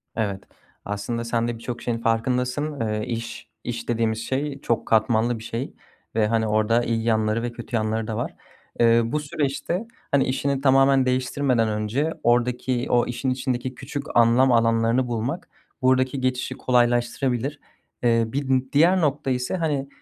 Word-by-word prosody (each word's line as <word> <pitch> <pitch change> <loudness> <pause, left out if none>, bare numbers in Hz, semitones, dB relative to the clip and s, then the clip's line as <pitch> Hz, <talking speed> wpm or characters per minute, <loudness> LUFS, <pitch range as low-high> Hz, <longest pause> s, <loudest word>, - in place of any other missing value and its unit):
Evet. 100 -4 -2 0.4
Aslında 105 +4 -3
sen 115 0 0
de 120 -1 -3
birçok 120 +1 -6
şeyin 120 -1 -1
farkındasın. 125 +6 -1
Iıı, 105 -1 -1
iş, 115 -1 -5
iş 120 -1 -5
dediğimiz 115 -1 0
şey 135 +4 -3
çok 115 -1 -1
katmanlı 110 +1 +2
bir 110 - -10
şey 115 +4 -4 0.4
ve, 110 -1 +3
hani, 110 0 +1
orada 110 +3 +2
iyi 115 -1 -1
yanları 110 0 +1
ve 120 - -2
kötü 120 0 -6
yanları 110 0 -1
da 110 -1 -3
var. - - -3 0.4
Iıı, 115 0 +4
bu 150 - +1
süreçte, 150 +8 -2 0.2
hani, 140 -1 +4
işini 135 +1 -1
tamamen 135 -1 +4
değiştirmeden 130 -2 +1
önce 110 +9 -1
oradaki 120 +1 +1
o 120 -1 +3
işin 125 +2 -2
içindeki 130 0 -2
küçük 140 +1 -5
anlam 120 +3 +5
alanlarını 115 +2 +3
bulmak 120 +9 -3 0.3
buradaki 130 +1 +2
geçişi 130 0 -1
kolaylaştırabilir. 125 +2 +1 0.4
Eee, 115 -1 +4
bir 130 +1 0
diğer 170 +6 +4
nokta 145 -2 0
ise, 125 +7 -1
hani, 145 -5 -1
120 Hz, 155 wpm, -24 LUFS, 115-135 Hz, 0.4 s, anlam